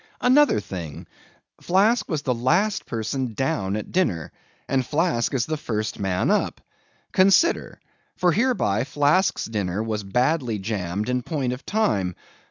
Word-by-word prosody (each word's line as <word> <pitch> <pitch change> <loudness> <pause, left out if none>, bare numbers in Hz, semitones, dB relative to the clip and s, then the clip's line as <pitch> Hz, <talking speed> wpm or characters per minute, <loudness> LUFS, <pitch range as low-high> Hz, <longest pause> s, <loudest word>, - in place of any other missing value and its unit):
Another 270 - +5
thing. 85 -7 -7 0.6
Flask 205 +7 +2
was 155 -4 -2
the 130 - +1
last 170 - +1
person 115 +1 -3
down 100 -7 -1
at 105 - -3
the - - -16
dinner, 90 - 0 0.4
and 135 -1 +1
Flask 150 -3 0
is 130 -5 0
the 155 - -2
first 110 -6 -3
man 95 -2 0
up. - - 0 0.5
Consider! 195 - +3 0.4
For 180 -1 +3
hereby 205 - +1
Flask's 145 +7 +1
dinner 105 -2 -2
was 110 -1 -2
badly 125 +3 0
jammed 100 -1 -3
in 125 0 0
point 130 -3 -2
of 125 +2 -10
time. 100 - 0
125 Hz, 145 wpm, -24 LUFS, 105-170 Hz, 0.6 s, Another